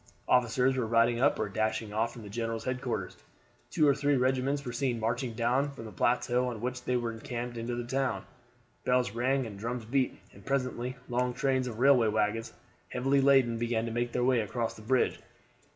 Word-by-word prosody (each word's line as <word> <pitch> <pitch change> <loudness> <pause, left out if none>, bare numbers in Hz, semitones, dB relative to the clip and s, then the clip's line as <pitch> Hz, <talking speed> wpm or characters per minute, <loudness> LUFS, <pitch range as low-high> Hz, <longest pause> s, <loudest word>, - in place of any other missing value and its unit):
Officers 125 +1 +3
were 125 -3 -1
riding 115 +1 +3
up 140 +3 +3
or - - -1
dashing 110 +1 -2
off 115 +2 0
from 115 - -10
the - - -9
general's 115 +1 -3
headquarters. 125 -6 -3 0.5
Two 155 -3 +3
or 140 - +6
three 145 0 +1
regiments 130 +2 +1
were 120 - -3
seen 120 -1 -1
marching 115 +2 -1
down 125 +5 +1
from 130 -5 -9
the 110 - -8
plateau 125 +5 +1
on 120 -3 -4
which 125 +2 -4
they 125 - +1
were 120 -1 -2
encamped 120 +1 -5
into 115 +1 -3
the 120 - -3
town. 125 -5 -1 0.6
Bells 125 -3 +2
rang 130 +4 +1
and 100 -3 -8
drums 120 +1 -4
beat, 130 +2 0 0.2
and - - -15
presently 130 -2 -2
long 125 0 0
trains 130 -1 +1
of 115 -3 -5
railway 130 -2 +5
wagons, 110 +1 0 0.4
heavily 135 +2 +2
laden, 135 -4 +4
began 115 -1 0
to 115 - -4
make 120 +1 -1
their 125 - 0
way 125 -1 +3
across 115 +2 -2
the - - -13
bridge. 125 +3 +1
120 Hz, 200 wpm, -30 LUFS, 115-130 Hz, 0.6 s, or